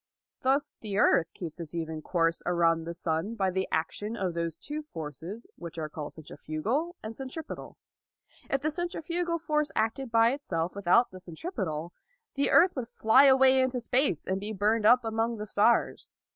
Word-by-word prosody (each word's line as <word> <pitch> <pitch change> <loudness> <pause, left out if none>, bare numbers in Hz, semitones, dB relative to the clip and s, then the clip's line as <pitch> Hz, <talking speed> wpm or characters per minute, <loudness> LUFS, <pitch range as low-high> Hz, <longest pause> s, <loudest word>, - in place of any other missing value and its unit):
Thus 275 +3 +1
the 205 -3 -4
earth 170 -5 +4
keeps 170 -2 -7
its 165 0 -7
even 160 -2 -4
course 165 0 +1
around 165 -2 +2
the 170 - -4
sun 165 +6 -2
by 190 -4 +1
the 190 +1 -1
action 205 +8 -2
of 185 -4 -1
those 170 -1 -3
two 295 - -5
forces 170 - -7
which 170 -1 -8
are 155 -1 -3
called 150 -1 -7
centrifugal 220 - -3
and 220 +1 -6
centripetal. 270 +5 -7 0.7
If 275 - 0
the 310 +2 0
centrifugal 345 0 -2
force 305 -2 0
acted 225 +4 0
by 230 0 +5
itself 180 - -2
without 200 +5 +3
the 185 - -10
centripetal, 175 - -5 0.4
the 280 0 +1
earth 360 +2 +5
would 250 -4 -3
fly 245 +3 +5
away 265 -1 +6
into 260 -1 0
space 245 - +1
and 190 +1 -1
be 205 +2 -4
burned 210 +2 +2
up 245 +1 +6
among 225 +1 -1
the 210 - -5
stars. 215 +3 +2
215 Hz, 170 wpm, -29 LUFS, 170-265 Hz, 0.7 s, away